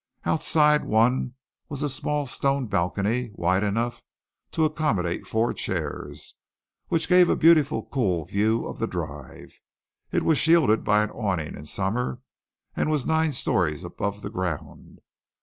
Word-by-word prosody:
Outside 150 -1 +3
one 120 +3 +1 0.3
was 145 0 -4
a - - +1
small 145 +1 -1
stone 135 0 0
balcony 105 +5 -1
wide 95 -1 +1
enough 115 +4 -1 0.5
to 160 - +1
accommodate 150 - -1
four 115 +2 0
chairs, - - -5 0.5
which 165 0 0
gave 180 -1 +6
a - - +3
beautiful, 155 -3 +4
cool 95 - -1
view 110 +5 0
of - - -7
the - - 0
drive. 70 -2 -7 0.5
It - - +1
was 160 -3 +3
shielded 155 -9 +4
by 105 0 +3
an 105 - -4
awning 95 -9 -2
in 75 - -10
summer 110 +8 -2 0.6
and - - 0
was 150 -4 0
nine 160 0 +2
storeys 90 - 0
above 100 0 -4
the 100 - -5
ground. 90 -7 -5
115 Hz, 145 wpm, -25 LUFS, 100-150 Hz, 0.6 s, gave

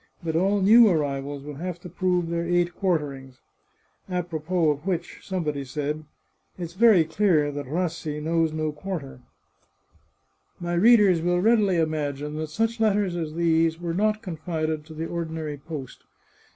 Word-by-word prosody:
But 160 -1 -2
all 195 +4 +2
new 225 +4 +7
arrivals 140 -4 -2
will 145 -1 -8
have 175 +2 -5
to 180 - -8
prove 180 0 0
their 170 0 -1
eight 175 0 +1
quarterings. 140 -8 -2 0.7
A 180 -1 -1
propos 160 -2 0
of 160 - -13
which 175 -3 -3
somebody 155 -7 -3
said, 150 +3 -4 0.2
' - - -43
It's 170 -2 -6
very 210 -3 +6
clear 160 -4 +2
that 145 -1 -6
Rassi 160 -1 -2
knows 165 +1 +1
no 155 0 -2
quar 180 +4 -4
ter/ 135 -3 -12 0.7
" - - -39
My 175 0 -3
readers 200 -2 +5
will 175 +1 +1
readily 205 -3 +3
imagine 150 -2 -2
that 155 0 -4
such 225 +7 -1
letters 205 -4 +2
as 160 -2 -4
these 165 -1 +2
were 170 -1 -3
not 215 +4 0
confided 160 -3 -3
to 160 - -11
the 160 +1 -3
ordinary 160 -3 -4
post. 140 -4 -8
165 Hz, 165 wpm, -25 LUFS, 150-180 Hz, 0.7 s, new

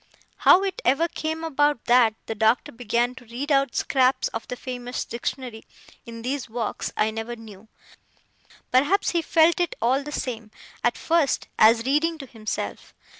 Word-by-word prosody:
How 380 - +6
it 390 -2 -3
ever 275 +7 +3
came 320 0 -4
about 295 -4 +1
that 240 -3 +4
the - - -3
Doctor 220 +2 +1
began 240 +1 -1
to 255 -1 -14
read 250 +6 -5
out 275 -3 +2
scraps 260 -1 +2
of 225 - -6
the 250 - -4
famous 245 0 -5
Dictionary, 240 -1 -5 0.4
in 230 -1 -8
these 265 0 -3
walks, 225 -1 -3
I 215 +1 +2
never 225 +2 -5
knew; 220 -2 -13 1.0
perhaps 290 +11 +3
he 340 - +1
felt 325 +1 +3
it 350 -2 0
all 255 +4 +2
the 295 +1 -8
same, 230 -6 -4 0.3
at - - +1
first, 325 -5 +1
as 225 +1 +6
reading 310 +5 +1
to 280 - -8
himself. 215 - -6
250 Hz, 165 wpm, -24 LUFS, 230-295 Hz, 1.0 s, How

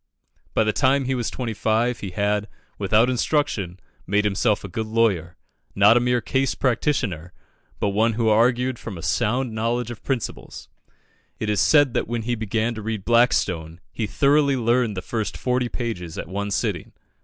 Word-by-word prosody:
By - - +4
the 110 0 0
time 135 +3 +2
he 130 - 0
was 120 -3 -1
twenty 120 -3 -4
five, 115 +3 0
he 100 - -5
had, 105 +2 -1 0.3
without 105 +4 +3
instruction, 125 - -1 0.3
made 105 +2 +2
himself 105 +1 +1
a - - -5
good 110 +4 -4
lawyer 105 -7 0 0.4
not 105 +3 +6
a - - +5
mere 125 0 +1
"case 135 +4 0
practitioner," 115 - -1 0.5
but 100 - +1
one 110 +3 +2
who 115 +1 0
argued 120 +3 +2
from 100 -6 -7
a 80 - -9
sound 110 +7 0
knowledge 115 +2 -1
of 120 - -9
principles. 130 -5 -4 0.7
It 110 -1 -2
is 105 - +1
said 145 -5 +4
that - - -1
when 115 -1 -3
he 120 +2 -1
began 110 +1 -1
to 110 - -7
read 110 -3 -4
Blackstone, 95 -9 +2
he 110 - -3
thoroughly 140 +6 +3
learned 120 -3 +1
the 90 - -4
first 110 0 -3
forty 125 -1 0
pages 90 -11 -5
at - - -5
one 100 +3 -3
sitting. 100 - -2
115 Hz, 180 wpm, -23 LUFS, 100-125 Hz, 0.7 s, not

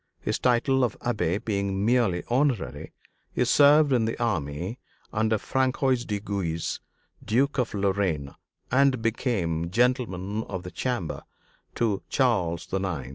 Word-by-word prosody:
His - - -2
title 130 +2 +2
of 120 -4 -1
Abbé 105 -3 -1
being 100 -2 -1
merely 115 -7 +2
honorary, 125 - 0 0.4
he 125 - +1
served 145 +2 +5
in 120 -3 +3
the 115 - -2
army 90 - -2 0.3
under 110 0 +2
François 130 +1 0
de 105 -1 -1
Guise, 95 -5 -3 0.4
Duke 135 +5 +1
of 120 -3 -1
Lorraine, 95 -8 0 0.4
and 130 -2 +3
became 95 -8 -1
Gentleman 110 -3 0
of 95 -2 -5
the 90 - -7
Chamber 120 -10 -3 0.5
to 105 -5 0
Charles 90 - +1
IX. 90 -9 -2
110 Hz, 130 wpm, -26 LUFS, 95-125 Hz, 0.5 s, served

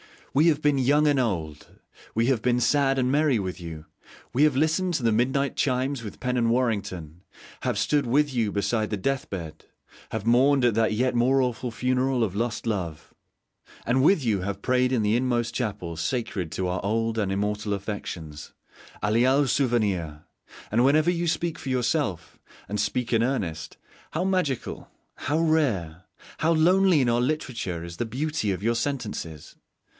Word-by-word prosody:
We 150 +5 +4
have 155 -3 +2
been 145 -2 +3
young 145 +4 +3
and 145 -2 +3
old, 80 -11 -2 0.5
we 115 +2 +2
have 130 -4 +2
been 125 +1 +1
sad 135 +2 +2
and 130 -1 +1
merry 145 -3 +3
with 95 -3 -4
you, 80 -2 -8 0.5
we 140 - +3
have 150 -3 +4
listened 165 +5 +1
to 135 - -2
the 115 - +3
mid 120 +4 +2
night 140 -1 -1
chimes 130 -1 0
with 105 - -9
Pen 125 0 -1
and 115 -1 +2
Warrington, 100 -9 -1 0.4
have - - 0
stood 145 -3 +1
with 145 +3 +2
you 115 -4 0
beside 110 +2 0
the 105 - -2
death 135 +6 -2
bed, 80 -5 -7 0.4
have 110 -2 -4
mourned 130 +3 +4
at 120 - +3
that 110 0 +2
yet 125 +4 +1
more 130 +3 +3
awful 125 0 -2
funeral 125 +1 0
of 100 -5 -1
lost 115 +3 -2
love, 90 -9 -4 0.7
and 130 +2 +2
with 160 -1 +4
you 110 -5 +1
have 100 +1 -4
prayed 125 0 +2
in 115 -4 +1
the 105 +2 +2
inmost 120 -2 0
chapel 95 -9 -3
sacred 95 -2 -2
to 95 - -2
our 90 0 -2
old 115 +2 0
and 100 -3 0
immortal 105 +1 -1
affections, 90 -7 -6 0.5
a' 105 - +1
léal 130 +5 +3
souvenir! 105 - 0 0.5
And 115 +3 +3
whenever 155 +5 +4
you 170 -1 -1
speak 170 0 -1
for 135 - -6
yourself, 125 - -1 0.3
and 105 0 -2
speak 125 -2 -1
in 115 - +3
earnest, 90 -11 -2 0.3
how 165 - -1
magical, 185 -9 -2 0.3
how 145 +4 -1
rare, 110 - 0 0.3
how 165 +1 +2
lonely 180 0 +4
in 125 - +2
our 120 +1 +2
literature 120 - -2
is 85 0 -8
the 120 - -1
beauty 135 -2 -2
of 95 +1 -4
your 115 +1 +1
sentences! 110 - -4
120 Hz, 180 wpm, -25 LUFS, 100-135 Hz, 0.7 s, We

